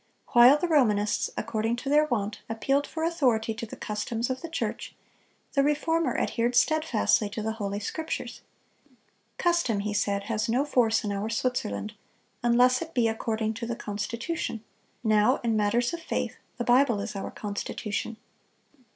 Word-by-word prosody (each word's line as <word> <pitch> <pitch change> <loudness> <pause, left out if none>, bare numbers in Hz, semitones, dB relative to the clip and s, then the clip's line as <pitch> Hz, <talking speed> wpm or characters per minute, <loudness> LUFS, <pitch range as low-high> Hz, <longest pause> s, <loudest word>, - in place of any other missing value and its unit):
While 245 +4 +7
the 355 - -1
Romanists, 215 -10 +2
according 225 0 -1
to 250 +3 -8
their 300 +1 +5
wont, 215 -7 -2
appealed 275 +5 0
for 320 - -4
authority 250 -10 +1
to 225 +1 -6
the - - -8
customs 225 +3 -3
of 260 - -4
the 335 - -6
church, 330 - -4 0.6
the 275 - +3
Reformer 320 +3 +1
adhered 240 +1 0
steadfastly 255 -7 +2
to 215 +1 -5
the 220 - -1
Holy 205 -2 -3
Scriptures. 315 +10 -4 1.0
"Custom," 340 - +1
he 210 +1 -2
said, 200 -1 0
"has 215 +1 -2
no 255 +5 +2
force 235 -6 +2
in 205 - -2
our 200 +2 -2
Switzerland, 215 - -2 0.5
unless 245 +1 +4
it 330 0 -7
be 240 -3 +3
according 220 0 -1
to 230 +1 -5
the 235 - -2
constitution; 230 +4 -4 0.4
now, 215 +3 +4
in 230 -2 +1
matters 230 +6 +1
of 340 - -4
faith, 325 - -3 0.2
the 240 - -1
Bible 245 -2 +4
is 205 +1 -5
our 195 - -4
constitution." 210 +1 -4
230 Hz, 160 wpm, -27 LUFS, 215-270 Hz, 1.0 s, While